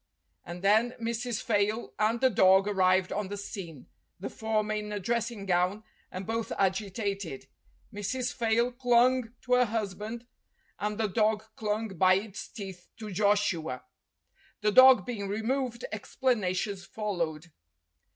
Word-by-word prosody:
And 175 +2 -8
then 220 +5 +3
Mrs. 230 0 -3
Fayle 215 +1 0
and 220 +2 +2
the 260 -1 +4
dog 190 0 +5
arrived 185 -2 +2
on 205 -1 -2
the 205 +1 -5
scene, 175 - -8 0.3
the 190 - -5
former 215 -1 -1
in 210 0 -4
a 205 - -2
dressing 230 0 -2
gown, 185 +3 +1 0.3
and 185 +1 -6
both 225 +2 -2
agi 195 +1 +1
tated. 195 - -4 0.5
Mrs. 250 +5 -2
Fayle 235 +1 +1
clung 245 -1 +3
to 250 - 0
her 250 0 +5
husband, 220 +1 -4 0.5
and 210 0 -2
the 225 - +1
dog 215 +1 +1
clung, 215 +1 -2
by 185 0 +4
its 210 +2 -4
teeth, 190 -6 -9
to 215 -2 -7
Joshua. 190 -9 +1 0.8
The 210 0 +2
dog 260 +3 +8
being 215 -5 -4
removed, 235 +4 -2
explanations 205 -4 -1
followed. 170 -6 -4
210 Hz, 140 wpm, -29 LUFS, 195-230 Hz, 0.8 s, dog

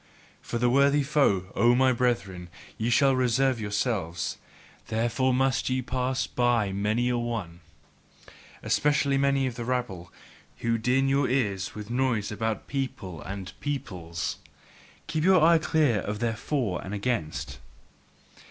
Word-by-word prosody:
For 120 - -4
the 120 +1 +2
worthier 140 +3 +4
foe, 120 -11 +1
O 120 +1 +4
my 130 0 +4
brethren, 100 -8 -1 0.4
shall 135 +3 +4
ye - - +1
reserve 130 0 +2
yourselves: 100 -5 -2 0.5
therefore 120 +4 0
must 130 +1 +1
ye 130 0 0
pass 130 +2 -1
by 120 -5 +1
many 105 +5 0
a 120 -1 0
one, 110 -8 -4 1.0
Especially 140 -2 +2
many 140 -1 +2
of 130 - -2
the 120 0 -6
rabble, 115 -9 -3 0.5
who 115 0 0
din 125 +4 +2
your 135 0 +2
ears 100 -8 -1
with 105 +1 -7
noise 120 -5 0
about 110 +1 -2
people 130 - -4
and 95 +2 -7
peoples. 90 - -4 0.7
Keep 155 -1 -2
your 185 -2 +5
eye 165 0 +6
clear 150 -8 +2
of 105 +2 -4
their 115 0 -1
For 110 - -2
and 95 +2 -5
Against! 100 -7 -3
120 Hz, 140 wpm, -27 LUFS, 105-135 Hz, 1.0 s, eye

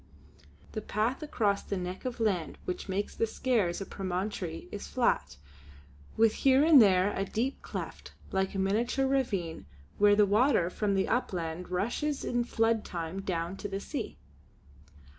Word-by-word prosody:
The 215 - -4
path 220 +7 -1
across 215 -9 0
the 200 - -4
neck 180 +3 -5
of 250 -1 -3
land 195 -8 0
which 180 - -4
makes 195 +2 -2
the 225 - +1
Skares 215 -8 0
a - - -3
promontory 185 -3 -4
is 205 - -6
flat, 75 - 0 0.8
with 225 -1 +5
here 270 +1 +5
and 310 -4 +8
there 195 -1 +4
a 195 - 0
deep 235 +7 -2
cleft - - -7 0.2
like 190 0 0
a - - -1
miniature 230 +8 +1
ravine 205 - -1 0.3
where 205 0 +6
the 210 0 +5
water 210 -3 +3
from 205 0 0
the 190 - +1
upland 180 -7 -2
rushes 240 +11 -1
in 240 0 +1
flood 225 -2 +1
time 170 +2 -4
down 175 -1 -3
to 205 - -5
the 195 -1 -3
sea. - - -5
200 Hz, 160 wpm, -30 LUFS, 185-235 Hz, 0.8 s, and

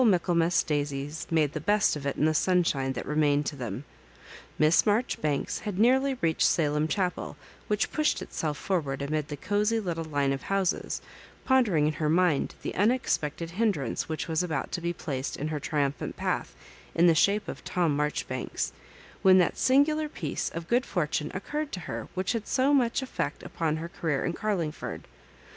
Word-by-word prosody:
Michaelmas 175 -5 +3
daisies 145 0 -2
made 155 -3 +2
the - - -2
best 205 +2 +3
of 140 -1 -4
it 140 - -1
in 150 - +2
the 155 - +3
sunshine 155 -6 +2
that 125 - -5
pemained 150 0 +2
to 145 - -3
them. 125 0 -5 0.7
Miss 155 +2 +5
Marjoribanks 205 - 0
had 205 -4 -4
nearly 265 +5 +4
reached 165 -1 +1
Salem 150 -1 +1
Chapel, 180 +3 -2 0.3
which 210 0 0
pushed 305 -1 +1
itself 150 -2 -3
forward 145 -8 -1
amid 150 +1 -1
the 145 - -6
cosy 210 +7 +1
little 170 -5 -3
line 145 -3 0
of 135 - -4
houses, 195 -2 -1 0.4
pondering 220 - +3
in 155 - +1
her 155 0 -1
mind 170 -3 +2
the - - -3
unexpected 180 - 0
hindrance 180 - -1
which 155 - -3
was 160 0 +1
about 160 -7 -2
to 175 - -3
be 170 +1 -1
placed 140 -5 -4
in 150 +2 -3
her 155 -1 -2
triumphant 140 -1 -2
path, - - -2 0.4
in 170 - +5
the 170 - +7
shape 200 +6 +2
of - - -7
Tom 170 -5 +1
Maijoribanks, 145 -3 -2 0.5
when 190 -1 +7
that 180 - +3
singular 300 +3 +3
piece 155 - -3
of 165 0 -6
good 245 +4 +2
fortune 150 - -1
occurred 295 +10 -3
to 185 - -4
her - - -5
which 185 0 0
had 230 -3 -3
so 270 +2 +2
much 255 -1 +2
effect 260 - -3
upon 160 -2 -1
her 165 +1 -5
career 160 -5 -1
in 170 - -1
Carlingford. 175 -7 -3
165 Hz, 175 wpm, -28 LUFS, 150-205 Hz, 0.7 s, the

